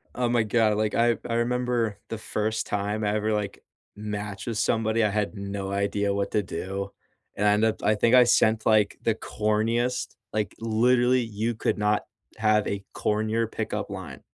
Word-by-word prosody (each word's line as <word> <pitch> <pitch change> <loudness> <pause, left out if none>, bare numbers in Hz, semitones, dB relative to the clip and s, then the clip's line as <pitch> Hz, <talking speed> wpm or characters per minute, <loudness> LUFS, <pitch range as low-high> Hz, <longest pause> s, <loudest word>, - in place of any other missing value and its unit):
Oh 125 0 +1
my 120 -1 +3
god, 110 -1 +2
like, 110 0 0
I 120 0 +3
I - - -1
remember 120 -3 0
the 115 - -4
first 110 0 -2
time 105 +1 -2
I 105 - +1
ever, 110 0 0
like, 105 -1 -3 0.3
matched 105 -1 -5
with 115 -2 -2
somebody, 110 0 +1
I 105 - +3
had 105 +1 -1
no 100 0 -4
idea 100 0 0
what 100 0 -2
to 105 - +2
do. 95 +2 -4 0.5
And 105 - +1
I - - +6
end 105 +1 +2
up 110 - -1
I 105 - +4
think 115 +4 +4
I 125 - +8
sent, 110 -2 +3
like, 110 -2 +3
the 115 - +2
corniest, 115 +4 -1 0.2
like, 105 -2 -2
literally, 120 +3 +3
you 115 +1 -2
could 110 - -1
not 105 0 +1 0.3
have 110 -1 +2
a 100 -1 -3
cornier 110 +1 0
pickup - - -3
line, - - -7
110 Hz, 185 wpm, -26 LUFS, 105-115 Hz, 0.5 s, I